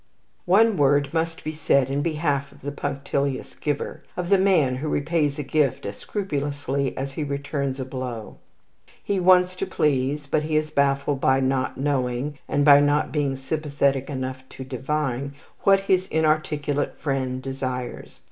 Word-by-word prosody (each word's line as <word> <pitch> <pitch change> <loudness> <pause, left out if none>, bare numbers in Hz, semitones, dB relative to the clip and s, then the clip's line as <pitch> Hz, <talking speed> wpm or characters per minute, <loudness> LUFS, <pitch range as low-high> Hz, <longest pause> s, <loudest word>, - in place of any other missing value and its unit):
One 210 +3 +5
word 140 0 +3
must 165 0 -1
be 155 - -3
said 140 -3 +2
in 140 +1 0
behalf 150 -3 -1
of - - -18
the 145 - -4
punctilious 140 -1 -2
giver, 145 -2 -3 0.2
of 180 -1 -2
the 195 -1 +5
man 165 -10 +3
who 150 +3 -3
repays 150 -1 0
a 150 - -2
gift 140 -1 0
as 100 0 -5
scrupulously 145 -7 -2
as 135 +1 -3
he 150 +3 -3
returns 140 -1 -3
a 130 - -3
blow. 125 -4 -6 0.7
He 200 -1 0
wants 180 0 +5
to - - -2
please, 145 0 0
but 150 +2 +1
he 155 0 -2
is 155 0 -1
baffled 140 -1 +1
by 130 0 +4
not 130 0 0
knowing, 135 0 -1
and 145 -1 +2
by 145 -1 +9
not 145 +1 +2
being 145 -3 0
sympathetic 140 -1 -1
enough 130 -2 -4
to 130 - -8
divine, 135 +1 -2 0.3
what 195 0 +6
his 190 -1 +1
inarticulate 155 -2 0
friend 130 -3 -2
desires. 130 -2 -5
140 Hz, 160 wpm, -24 LUFS, 135-155 Hz, 0.7 s, by